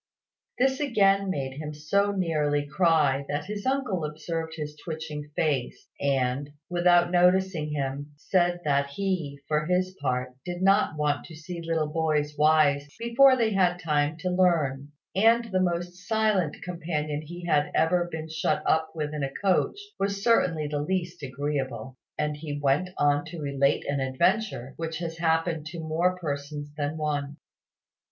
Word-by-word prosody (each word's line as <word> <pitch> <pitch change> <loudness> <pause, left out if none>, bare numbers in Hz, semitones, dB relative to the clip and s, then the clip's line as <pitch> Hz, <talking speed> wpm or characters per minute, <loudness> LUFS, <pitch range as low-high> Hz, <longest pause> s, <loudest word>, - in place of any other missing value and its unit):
This 265 +1 +2
again 200 -8 +3
made 135 -6 -3
him 150 -1 -5
so 200 +7 +1
nearly 150 -6 0
cry 150 -4 +3
that 145 - -2
his 205 +3 -5
uncle 250 - 0
observed 160 +2 -4
his 150 -1 -5
twitching 155 -2 -6
face, 145 -6 -1
and, 135 0 0 0.2
without 175 0 +4
noticing 180 -3 +3
him, 145 0 -3
said 175 +2 +1
that 140 -1 +2
he, 160 -2 -2
for 150 0 0
his 185 +1 0
part, 125 -2 -1
did 175 +1 -4
not 195 -4 +3
want 145 -1 0
to 165 - -11
see 170 +2 -7
little 165 -1 0
boys 150 -2 0
wise 150 -2 +4
before 255 +3 +5
they 225 -3 +2
had 180 -3 +2
time 150 -2 0
to 180 -1 -1
learn; 155 -7 +1 0.2
and 225 +4 +5
that 225 - -11
the 185 - +2
most 175 0 -2
silent 215 -8 +1
companion 155 -4 -3
he 175 +3 -9
had 150 -3 +2
ever 175 +2 +2
been 160 0 -5
shut 155 0 -1
up 160 0 +2
with 150 -1 -3
in 150 - -3
a 135 - -1
coach 190 - +1 0.2
was 200 0 -1
certainly 180 -9 +3
the 145 0 -2
least 175 +2 -2
agreeable: 130 -3 -3 0.2
and 150 0 -1
he 145 -1 -5
went 145 +6 +1
on 145 0 +3
to 170 - -8
relate 140 -2 +1
an 140 0 -1
adventure 135 - 0
which 160 -1 -3
has 165 -1 -5
happened 165 -1 +1
to 170 +2 -7
more 165 +3 0
persons 145 -2 -4
than 150 +1 -2
one. 145 -1 -2
160 Hz, 160 wpm, -27 LUFS, 145-180 Hz, 0.2 s, before